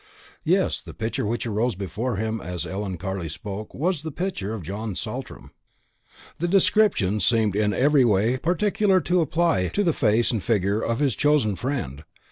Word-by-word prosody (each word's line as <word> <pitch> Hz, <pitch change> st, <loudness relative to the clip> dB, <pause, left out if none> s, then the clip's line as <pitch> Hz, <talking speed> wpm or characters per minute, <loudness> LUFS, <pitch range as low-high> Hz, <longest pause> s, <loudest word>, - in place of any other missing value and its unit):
Yes, 185 Hz, +3 st, +1 dB
the -, -, -11 dB
picture 110 Hz, -1 st, -2 dB
which 120 Hz, +3 st, -2 dB
arose 115 Hz, +1 st, 0 dB
before 105 Hz, +6 st, -3 dB
him 110 Hz, +2 st, -2 dB
as 90 Hz, -1 st, -4 dB
Ellen 95 Hz, -1 st, -4 dB
Carley 95 Hz, -2 st, -4 dB
spoke 100 Hz, +6 st, -7 dB
was 170 Hz, +2 st, 0 dB
the 160 Hz, -, -5 dB
picture 150 Hz, -, -3 dB
of 100 Hz, -, -7 dB
John 100 Hz, +4 st, -4 dB
Saltram. -, -, -6 dB, 0.9 s
The 175 Hz, -, 0 dB
description 185 Hz, -, +3 dB
seemed 110 Hz, -3 st, +2 dB
in 105 Hz, 0 st, +2 dB
every 125 Hz, -2 st, +3 dB
particular 195 Hz, -, +2 dB
to 175 Hz, +1 st, +2 dB
apply 160 Hz, -, +1 dB
to 205 Hz, -, 0 dB
the 170 Hz, -4 st, +2 dB
face 115 Hz, -2 st, +2 dB
and 115 Hz, -4 st, -1 dB
figure 100 Hz, 0 st, +1 dB
of 115 Hz, +4 st, -1 dB
his 140 Hz, -4 st, +2 dB
one -, -, -12 dB
chosen 145 Hz, -8 st, +3 dB
friend. 90 Hz, -, -4 dB
115 Hz, 170 wpm, -24 LUFS, 100-155 Hz, 0.9 s, description